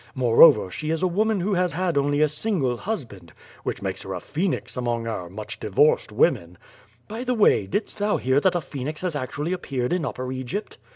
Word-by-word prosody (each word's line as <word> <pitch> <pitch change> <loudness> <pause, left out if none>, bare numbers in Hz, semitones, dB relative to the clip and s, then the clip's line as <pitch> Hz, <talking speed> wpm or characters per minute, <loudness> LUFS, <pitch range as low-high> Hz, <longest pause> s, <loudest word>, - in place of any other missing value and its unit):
Moreover, 115 - +6
she 155 - -4
is 160 +2 -1
a - - +4
woman 210 +2 +1
who 200 +3 0
has 180 -1 +1
had 180 -1 -1
only 145 +1 +1
a - - +4
single 150 - -1
hus 200 - -3
band— 95 -7 -15 0.3
^which - - -4
makes - - -3
her - - -5
a - - -4
phoenix 175 +4 -3
among 120 -2 -2
our 90 -6 -4
much 105 +3 -7
divorcod 110 +9 +2
women. 85 +1 +1 0.5
By 225 +3 -5
the 250 -1 0
way, 205 - +4
didst 205 - -3
thou 205 +1 +1
hear 130 +2 +2
that 180 +4 +2
a 175 - +1
phoenix 145 +1 -6
has 180 -4 -2
actually 145 +5 -3
appeared 135 -7 -2
in 180 -2 0
Upper 130 -2 -4
Egypt? 130 - -5
150 Hz, 210 wpm, -24 LUFS, 125-185 Hz, 0.5 s, Moreover